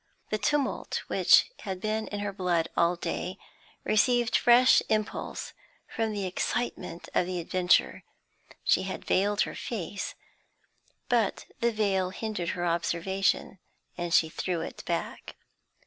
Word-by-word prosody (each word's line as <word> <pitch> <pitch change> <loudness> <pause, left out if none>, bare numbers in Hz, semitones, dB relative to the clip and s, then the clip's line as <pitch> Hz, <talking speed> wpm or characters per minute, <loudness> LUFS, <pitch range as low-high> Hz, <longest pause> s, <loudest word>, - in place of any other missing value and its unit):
The 215 - 0
tumult 295 0 -1
which - - +5
had 190 -3 -5
been 215 +2 -2
in 205 -1 -4
her 205 -1 -3
blood 175 -4 0
all 170 +1 +3
day 180 +1 -4 0.5
received 240 +2 +2
fresh 245 +2 +6
impulse 215 0 -2 0.3
from 225 -1 -2
the 205 -2 -3
excitement 185 -1 -3
of 175 - +2
the 180 -1 -2
adventure. 180 +1 +2 0.6
She - - +3
had 190 0 -5
veiled 205 +2 +2
her - - 0
face, 205 -4 -5 0.9
but 235 -5 +1
the 235 0 +2
veil 195 -4 +1
hindered 190 -3 -3
her 175 - -1
observation, 170 +3 0 0.4
and 175 -1 -4
she 165 - +5
threw 170 +1 -3
it - - -7
back. - - -4
195 Hz, 130 wpm, -28 LUFS, 180-220 Hz, 0.9 s, fresh